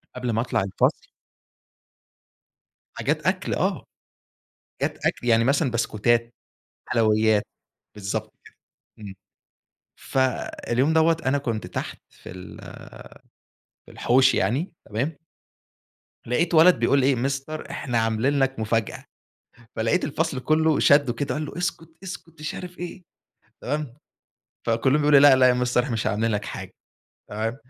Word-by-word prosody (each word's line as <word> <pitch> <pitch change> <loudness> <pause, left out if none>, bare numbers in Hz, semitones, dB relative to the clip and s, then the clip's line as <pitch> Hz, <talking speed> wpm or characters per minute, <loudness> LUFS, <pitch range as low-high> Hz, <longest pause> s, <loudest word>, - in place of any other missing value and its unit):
قبل 125 -1 -2
ما 115 - 0
أطلع 120 - -1
الفصل 95 - -1 1.9
حاجات - - -1
أكل - - 0
آه، - - -1 1.0
حاجات - - -2
أكل - - -1
يعني 115 0 +4
مثلًا 140 +2 +2
بسكوتات، 115 +1 0 0.5
حلويات، 110 -2 +2 0.5
بالضبط 100 -1 -4
كده. - - -17 0.4
إمم 100 -3 -9 0.9
فاليوم 130 +1 0
دوّة 160 0 +4
أنا 135 +2 +2
كنت 115 -6 -3
تحت - - -5
في - - -13
ال 90 0 -10 1.3
في - - -15
الحوش 130 +2 +3
يعني 130 - 0
تمام. 135 +9 -3 1.1
لقيت 160 +9 0
ولد 170 +3 +6
بيقول 140 -1 +3
إيه، 135 0 +3
Mister 135 +5 -3
إحنا 120 -4 -3
عاملين 115 +6 +1
لَك 135 -1 0
مفاجأة، 110 0 -1 0.7
فلقيت 115 +10 +1
الفصل 150 -2 -2
كله 155 +2 +2
شدّه 140 -3 +4
كده، 145 +3 -3
قال 155 - -3
له - - -8
اسكت 170 -2 -3
اسكت، 170 -4 -9
مش 155 - -4
عارف 180 0 -8
إيه، 175 +1 -7 0.6
تمام، 150 -5 -3 0.7
فكلهم 130 +6 +2
يقولوا 145 -1 +6
لأ، 140 -1 +8
لأ 130 -1 +5
يا - - +4
Mister 125 0 -1
إحنا 130 - -5
مش 110 - -1
عاملين 110 +2 0
لَك 105 -1 -2
حاجة، - - -7 0.6
تمام، 110 +3 -3
130 Hz, 130 wpm, -24 LUFS, 115-150 Hz, 1.9 s, لأ